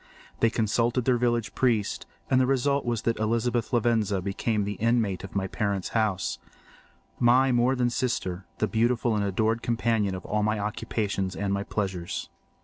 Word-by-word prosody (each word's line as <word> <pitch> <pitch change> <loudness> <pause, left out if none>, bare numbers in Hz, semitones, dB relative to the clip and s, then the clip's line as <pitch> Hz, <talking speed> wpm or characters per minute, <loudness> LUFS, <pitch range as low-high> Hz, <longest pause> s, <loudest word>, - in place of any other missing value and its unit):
They 115 - +4
consulted 115 +2 +1
their 125 -2 +3
village 120 -4 0
priest, 115 -6 0 0.2
and 130 0 +3
the 130 - +2
result 135 +1 +1
was 120 -2 -1
that 115 -1 0
Elizabeth 115 +1 0
Lavenza 115 -5 +2
became 100 +3 -1
the 100 -1 -4
inmate 115 -5 +1
of 95 - -9
my 95 -1 0
parents' 100 -1 -2
house—my 120 +4 -1
more 125 +2 +3
than 125 -1 +1
sister—the 100 -5 -2
beautiful 120 +1 +1
and 105 - 0
adored 110 +4 0
companion 115 -4 0
of 90 - -8
all 105 0 0
my 110 +1 +1
occupations 100 -2 -2
and 100 -1 -1
my 100 - 0
pleasures. 95 -4 -3
110 Hz, 155 wpm, -27 LUFS, 100-120 Hz, 0.2 s, They